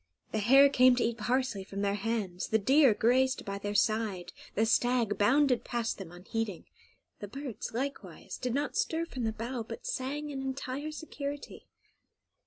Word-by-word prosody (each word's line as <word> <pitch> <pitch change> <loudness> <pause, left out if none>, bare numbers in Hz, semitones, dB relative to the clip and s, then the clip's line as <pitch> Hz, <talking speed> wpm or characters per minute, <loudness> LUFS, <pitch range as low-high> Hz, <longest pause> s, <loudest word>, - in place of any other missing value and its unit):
The 220 - 0
hare 270 +7 +7
came 255 -2 +5
to 245 - +1
eat 235 0 -1
parsley 240 -2 0
from 200 +1 -5
their 200 0 +1
hands, 205 -4 -2
the 220 - +3
deer 265 +5 +5
grazed 255 +3 +2
by 200 -1 -4
their 205 +1 -4
side, 205 -5 0 0.2
the 220 - +3
stag 235 -2 +2
bounded 260 +4 +3
past 235 -3 -2
them 180 -4 -8
unheeding; 195 +2 -4 0.5
the 205 - -6
birds, 270 +1 -6
likewise, 275 +5 -5
did 250 -1 -2
not 290 +1 -1
stir 330 +1 0
from 255 -7 -4
the 220 - +1
bough, 235 +3 -4
but 470 - -8
sang 295 - -3
in 270 -1 -4
entire 270 +2 -4
security. 290 -2 -7
240 Hz, 170 wpm, -30 LUFS, 210-270 Hz, 0.5 s, hare